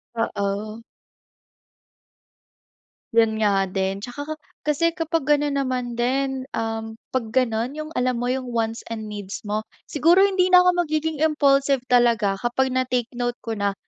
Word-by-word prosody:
Oo. 215 0 -2 2.3
Yan 220 -1 +3
nga 195 -2 +3
din, 190 +1 -2
'tsaka 245 +4 -7
ka 310 +2 -4 0.3
kasi 315 +3 +1
kapag 330 -2 -1
gano'n 290 -1 +2
naman 250 -3 -2
din, 265 +1 0
um, 225 0 -3 0.2
'pag 255 -3 -1
gano'n 245 0 +1
yung 310 0 -6
alam 250 -1 0
mo 245 - -1
yung 260 0 -1
wants 225 0 -2
and 220 -2 -6
needs 205 -2 -6
mo, 215 +1 -3 0.2
siguro 335 +5 +4
hindi 375 -2 +3
na 360 - +10
ako 360 - +4 0.2
magiging 310 0 -1
impulsive 280 -3 +3
talaga 230 -5 +3
kapag 245 +4 0
na 255 0 0
take 245 -1 -1
note 245 0 0
ko 225 -2 -4
na 200 -1 0
245 Hz, 150 wpm, -23 LUFS, 225-290 Hz, 2.3 s, na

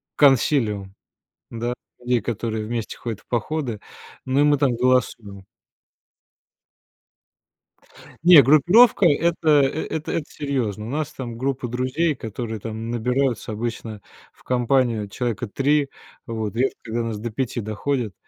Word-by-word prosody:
консилиум, 115 -8 +2 0.6
да, 120 +1 -3 0.3
людей, 125 -1 +1
которые 110 0 -3
вместе 115 -1 -4
ходят 115 -4 -5
в - - -29
походы. 125 -2 -2 0.5
Ну 135 +2 +2
и - - +5
мы 145 -1 +4
там 135 -4 +2
голосуем. 115 -6 0 2.8
Не, 170 -4 +9
группировка 175 - +5
это 165 +1 +1
эт 150 +2 +1
это 160 - -1
серьёзно. 120 -8 -3
У - - -6
нас 150 +2 -2
там 120 -3 -6
группа 130 -1 -2
друзей, 130 +6 0
которые 110 0 -5
там 110 +1 -6
набираются 125 0 -1
обычно 110 -1 -5 0.3
в - - -25
компанию 120 -4 +1
человека 120 -3 -3
3, 140 +5 +1 0.4
вот, 110 -4 -4
редко, 130 +3 0
когда 115 +1 -3
нас 115 -2 -3
до 115 +3 -4
5 120 +1 -3
доходит, 110 +1 -2
125 Hz, 130 wpm, -22 LUFS, 110-140 Hz, 2.8 s, Не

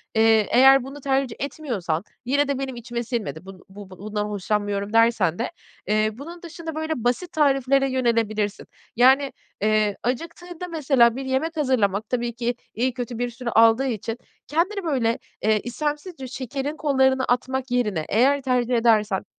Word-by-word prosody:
eee, 220 -2 +4
eğer 270 +1 +7
bunu 275 +2 -9
tercih 270 -3 0
etmiyorsan, 235 - -3 0.2
"Yine 285 +3 +2
de 280 -2 -1
benim 265 -2 -4
içime 240 0 -5
sinmedi, 220 -8 -4
bun 190 -1 -12
bu 200 0 -11
bundan 210 +3 -4
hoşlanmıyorum" 205 0 -2
dersen 225 -7 +3
de, 235 - -2 0.4
eee, 215 +1 +2
bunun 330 +9 -10
dışında 330 -1 -7
böyle 315 0 -2
basit 250 +9 0
tariflere 275 -2 +2
yönelebilirsin; 225 -5 0 0.3
yani, 265 +3 +5 0.3
eee, 215 -1 +2
acıktığında 335 +7 -4
mesela 270 -8 +3
bir 270 +1 -5
yemek 270 +5 -1
hazırlamak 215 -8 +1
tabii 240 -1 -1
ki 240 +1 -2 0.2
iyi 250 +2 0
kötü 245 -2 -5
bir 245 0 -1
süre 240 0 -5
aldığı 230 +4 +5
için 225 0 -3 0.3
kendini 375 +6 0
böyle, 250 -8 0 0.2
eee, 215 0 +3
istemsizce 295 +3 -4
şekerin 270 +4 -4
kollarına 265 -3 +2
atmak 260 +1 -1
yerine, 210 -10 0
eğer 270 +6 +3
tercih 250 -2 +1
edersen, 220 -4 +2
245 Hz, 150 wpm, -23 LUFS, 220-275 Hz, 0.4 s, eğer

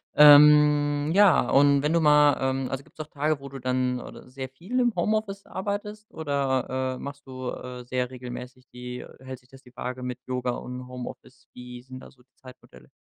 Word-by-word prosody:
Ähm, 150 0 +6
ja, 190 -10 +5
und 140 0 +4
wenn 150 - +1
du 170 - +3
mal 150 -2 +5
ähm, 130 0 -1
also, 135 0 -4
gibt's - - -25
auch 150 - -8
Tage, 150 -1 -2
wo 140 - -9
du 135 0 -9
dann 125 0 -1
oder 125 - -11
sehr 130 0 -6
viel 185 - -4
im 240 -2 +2
Homeoffice 200 +2 -1
arbeitest 210 +2 -6
oder, 130 -3 -1
äh, - - -10
machst 140 0 -9
du, 130 -1 -6
äh, 125 -1 -8
sehr 125 0 -2
regelmäßig 125 0 -9
die 125 0 -8
hält 130 -1 -9
sich 125 - -28
das 135 0 -16
die 125 0 -19
Waage 125 +1 -5
mit 125 0 -5
Yoga 125 -1 -2
und 125 +1 -7
Homeoffice? 125 -1 -10
Wie 125 0 -10
sind 130 0 -11
da - - -14
so 125 -2 -25
die 135 - -51
Zeitmodelle? 130 -1 -16
130 Hz, 200 wpm, -26 LUFS, 125-150 Hz, -, Ähm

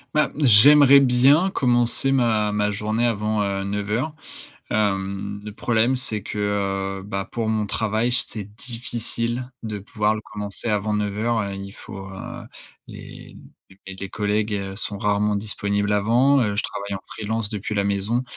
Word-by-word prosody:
Bah, 150 - +3
j'aimerais 140 +2 +7
bien 135 +8 +4
commencer 120 -1 +2
ma 115 -5 +2
ma 105 0 0
journée 110 +3 -1
avant 105 -3 0
09:00. 105 +9 -2 0.5
Hem, 100 -1 -1
le 105 - -7
problème, 115 +4 +1
c'est 110 -4 +3
que, 105 - -7 0.6
heu, - - -9
bah, 100 -1 -4
pour 115 -2 -3
mon 110 -1 0
travail, 110 +3 -1
j 125 - +1
c'est 110 -3 -6
difficile 120 +1 -4
de 105 -2 -4
pouvoir 105 +1 0
le 110 - -5
commencer 105 +2 -4
avant 105 0 0
09:00. 105 +3 0
Heu, 100 -1 -4
il 100 0 -7
faut, 95 -1 -9
heu, 95 0 -8 0.4
les - - -11 0.5
les 95 - -7
les 95 0 -7
collègues 105 -2 -2
sont 100 0 -3
rarement 105 0 +1
disponibles 100 0 -1
avant, 120 +7 +3
heu, 105 -5 0
je 105 - +1
travaille 100 0 -5
en 95 - -5
freelance 110 0 -3
depuis 105 0 -4
la 100 -1 +1
maison, 100 +5 0
105 Hz, 155 wpm, -23 LUFS, 100-120 Hz, 0.6 s, j'aimerais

